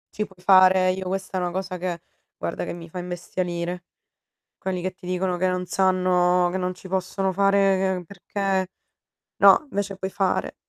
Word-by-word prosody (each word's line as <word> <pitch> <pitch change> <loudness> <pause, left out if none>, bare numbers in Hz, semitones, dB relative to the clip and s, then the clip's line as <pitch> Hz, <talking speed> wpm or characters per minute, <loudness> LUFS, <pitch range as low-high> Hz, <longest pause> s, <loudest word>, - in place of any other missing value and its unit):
Si 210 0 -2
può 190 - -20
fare, 185 0 +5
io 185 0 -4
questa 190 0 -3
è - - -2
una 175 - -1
cosa 185 0 -4
che 175 -2 -3 0.4
guarda - - -3
che - - -5
mi 170 -1 -9
fa 180 +2 -7
imbestialire. 175 0 -4 0.7
Quelli 185 -2 -3
che 185 +1 -2
ti 185 0 -14
dicono 180 0 -1
che 185 +1 +2
non 180 0 -1
sanno 180 -1 +2
che 190 - -1
non 185 0 -2
ci 190 - -13
possono 190 +1 -1
fare 195 -1 +3
e 180 - -6
perché 190 +1 -2 0.7
no, 200 +8 +7
invece 200 -2 -3
puoi 190 0 -3
fare. 195 0 -1
185 Hz, 180 wpm, -24 LUFS, 180-190 Hz, 0.7 s, no